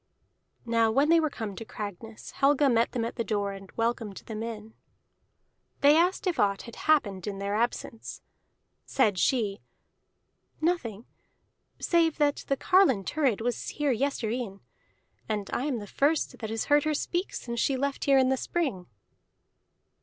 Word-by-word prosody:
Now 230 Hz, -1 st, +3 dB
when 275 Hz, +7 st, +2 dB
they 335 Hz, 0 st, +6 dB
were 310 Hz, -1 st, +1 dB
come 220 Hz, -7 st, -6 dB
to 225 Hz, -, -6 dB
Cragness, 215 Hz, +1 st, -8 dB
Helga 280 Hz, 0 st, +3 dB
met 230 Hz, 0 st, +2 dB
them 235 Hz, -2 st, -1 dB
at 230 Hz, -, -6 dB
the 230 Hz, -, 0 dB
door 205 Hz, -1 st, -1 dB
and 195 Hz, -1 st, -10 dB
welcomed 230 Hz, -3 st, -2 dB
them 220 Hz, -1 st, -5 dB
in. 220 Hz, -1 st, -6 dB, 1.1 s
They 285 Hz, +1 st, +7 dB
asked 355 Hz, +5 st, +2 dB
if 355 Hz, -4 st, 0 dB
aught 200 Hz, -1 st, +2 dB
had 235 Hz, -, -10 dB
happened 210 Hz, -, +1 dB
in 200 Hz, -1 st, -3 dB
their 200 Hz, +1 st, -3 dB
absence. 230 Hz, 0 st, -3 dB, 0.6 s
Said 210 Hz, -8 st, +1 dB
she, 210 Hz, -4 st, +1 dB, 1.0 s
"Nothing 255 Hz, -, -1 dB, 0.7 s
save 330 Hz, -2 st, +2 dB
that 290 Hz, -1 st, +1 dB
the 275 Hz, -, +1 dB
carline 360 Hz, -, +4 dB
Thurid 260 Hz, -, 0 dB
was 245 Hz, +1 st, -2 dB
here 295 Hz, -3 st, 0 dB
yestreen, 235 Hz, -5 st, -2 dB, 0.7 s
and 210 Hz, -2 st, -2 dB
I 255 Hz, -, -1 dB
am 280 Hz, -5 st, -1 dB
the 210 Hz, -, -6 dB
first 285 Hz, +9 st, 0 dB
that 220 Hz, -, -5 dB
has 225 Hz, 0 st, -2 dB
heard 290 Hz, 0 st, +4 dB
her 310 Hz, 0 st, 0 dB
speak 350 Hz, +5 st, -2 dB
since 235 Hz, -1 st, -4 dB
she 270 Hz, +2 st, +1 dB
left 280 Hz, +1 st, -2 dB
here 275 Hz, -1 st, +5 dB
in 260 Hz, -1 st, +4 dB
the 265 Hz, -, +2 dB
spring." 255 Hz, -, -2 dB
235 Hz, 160 wpm, -28 LUFS, 215-285 Hz, 1.1 s, They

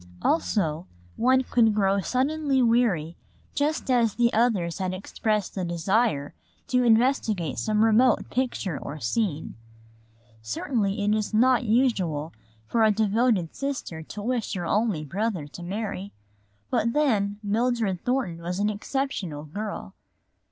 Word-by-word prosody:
Also 180 Hz, -, 0 dB, 0.3 s
one 260 Hz, +2 st, +3 dB
could 225 Hz, -4 st, +3 dB
grow 200 Hz, -1 st, +2 dB
suddenly 275 Hz, -, 0 dB
weary 220 Hz, -9 st, +2 dB, 0.4 s
just 290 Hz, -2 st, 0 dB
as 235 Hz, -4 st, +3 dB
the 240 Hz, 0 st, +2 dB
others 210 Hz, -7 st, +1 dB
had 185 Hz, -1 st, -2 dB
expressed 210 Hz, +1 st, -2 dB
the 190 Hz, -, -3 dB
desire 175 Hz, -2 st, 0 dB, 0.3 s
to 250 Hz, 0 st, +2 dB
investigate 225 Hz, -, +2 dB
some 215 Hz, 0 st, +2 dB
remote 225 Hz, +2 st, +4 dB
picture 240 Hz, -, -2 dB
or 150 Hz, +2 st, -7 dB
scene. 155 Hz, -, -1 dB, 0.9 s
Certainly 200 Hz, -, -1 dB
it 210 Hz, -, +3 dB
is 215 Hz, 0 st, -1 dB
not 250 Hz, +2 st, +4 dB
usual 195 Hz, -, +1 dB, 0.3 s
for 225 Hz, -, +1 dB
a 220 Hz, -, +6 dB
devoted 215 Hz, -3 st, +1 dB
sister 275 Hz, -12 st, -4 dB
to 205 Hz, +6 st, -8 dB
wish 240 Hz, -2 st, -1 dB
her 175 Hz, -2 st, -3 dB
only 205 Hz, -5 st, 0 dB
brother 190 Hz, 0 st, -2 dB
to 175 Hz, -, -10 dB
marry. 200 Hz, +1 st, -4 dB, 0.6 s
But 230 Hz, +1 st, +1 dB
then, 210 Hz, -9 st, +1 dB
Mildred 220 Hz, -3 st, 0 dB
Thornton 245 Hz, -10 st, -1 dB
was 175 Hz, +2 st, -3 dB
an 205 Hz, +1 st, +1 dB
exceptional 205 Hz, -, -3 dB
girl. 200 Hz, -, -6 dB
215 Hz, 130 wpm, -26 LUFS, 180-240 Hz, 0.9 s, a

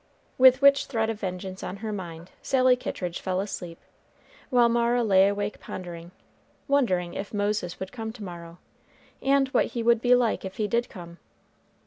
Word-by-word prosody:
With 260 Hz, +1 st, +6 dB
which 280 Hz, 0 st, +5 dB
threat 225 Hz, -4 st, 0 dB
of 215 Hz, -, -7 dB
vengeance 185 Hz, -1 st, -5 dB
on 195 Hz, -, -5 dB
her 215 Hz, -, -3 dB
mind 170 Hz, -3 st, -8 dB
Sally 255 Hz, -2 st, +3 dB
Kittridge 180 Hz, -8 st, -5 dB
fell 185 Hz, -1 st, -1 dB
asleep, 180 Hz, -4 st, -5 dB, 0.7 s
while 245 Hz, -2 st, +4 dB
Mara 235 Hz, +1 st, +2 dB
lay 195 Hz, -3 st, +5 dB
awake 205 Hz, +1 st, -2 dB
pondering, 175 Hz, -2 st, -8 dB, 0.6 s
wondering 185 Hz, -, +1 dB
if 200 Hz, +2 st, -6 dB
Moses 205 Hz, -4 st, -2 dB
would 190 Hz, 0 st, -6 dB
come 225 Hz, -3 st, -5 dB
to 220 Hz, -3 st, -10 dB
morrow, 170 Hz, -2 st, -9 dB, 0.6 s
and 275 Hz, 0 st, +3 dB
what -, -, +2 dB
he 230 Hz, -, -1 dB
would 235 Hz, -1 st, +3 dB
be 245 Hz, 0 st, +5 dB
like 240 Hz, -3 st, +1 dB
if 190 Hz, 0 st, -7 dB
he 215 Hz, -, 0 dB
did 235 Hz, +2 st, 0 dB
come. 170 Hz, -3 st, -11 dB
205 Hz, 170 wpm, -26 LUFS, 185-240 Hz, 0.7 s, With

